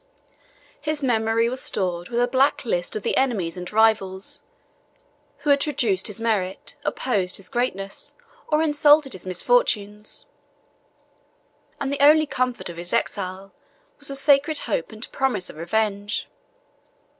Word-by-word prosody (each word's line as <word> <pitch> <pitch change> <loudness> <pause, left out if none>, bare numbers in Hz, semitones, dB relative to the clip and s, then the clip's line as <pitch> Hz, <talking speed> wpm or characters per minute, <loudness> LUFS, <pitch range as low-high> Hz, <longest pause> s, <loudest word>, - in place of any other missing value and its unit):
His 305 -1 -1
memory 225 -2 +2
was 255 +2 -4
stored 180 -1 -1
with 240 0 -1
a 245 - +3
black 265 +2 +2
list 175 -6 -1
of 215 - -3
the - - 0
enemies 210 -11 0
and 180 -1 -7
rivals, 210 -3 +2 1.0
who 290 - +4
had 280 0 +4
traduced 230 -11 0
his 210 +1 -5
merit, 205 -5 -1
opposed 195 -8 -1
his 190 -2 -11
greatness, 195 -5 -3 0.3
or 305 +1 +2
insulted 295 -2 +4
his 185 - -8
misfortunes; 210 - +1 1.5
and 280 0 -2
the 280 - -3
only 310 +2 +7
comfort 255 -4 -2
of 170 -1 -8
his 175 +1 -6
exile 195 -4 -2 0.5
was 285 - -4
the 275 - -2
sacred 285 +2 +3
hope 200 -8 -2
and 220 +2 -9
promise 265 -9 -1
of - - -18
revenge. 205 +4 -1
225 Hz, 140 wpm, -23 LUFS, 195-275 Hz, 1.5 s, only